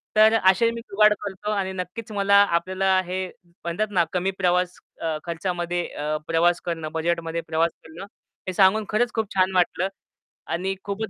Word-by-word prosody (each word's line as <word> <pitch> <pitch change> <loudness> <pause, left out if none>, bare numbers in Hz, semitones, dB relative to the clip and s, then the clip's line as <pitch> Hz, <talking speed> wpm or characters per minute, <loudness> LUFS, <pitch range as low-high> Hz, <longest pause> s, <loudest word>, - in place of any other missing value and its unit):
तर 215 +1 +6
असे 190 +5 +5
मी 230 0 -6
जुगाड 210 -1 +4
करतो 205 +1 -4
आणि 195 -2 -1
नक्कीच 185 +5 -6
मला 200 -1 +2 0.2
आपल्याला 190 +2 +1
हे 185 +1 -3 0.2
म्हणतात 170 +4 -4
ना, 180 -3 +3
कमी 185 +1 0
प्रवास 180 -1 +1 0.5
खर्चामध्ये 175 0 -2
अ, 150 +1 -3
प्रवास 170 +1 +2
करणं 165 -3 -3
बजेटमध्ये 165 0 -1
प्रवास 165 +1 +1
करणं, 160 +4 -10 0.4
हे 185 - -2
सांगून 200 +3 +4
खरंच 235 +3 +1
खूप 220 -3 -2
छान 185 0 +3
वाटलं 180 +1 +2 0.7
आणि 190 +3 -1
खूपच 205 +2 -4
185 Hz, 155 wpm, -24 LUFS, 170-200 Hz, 0.7 s, तर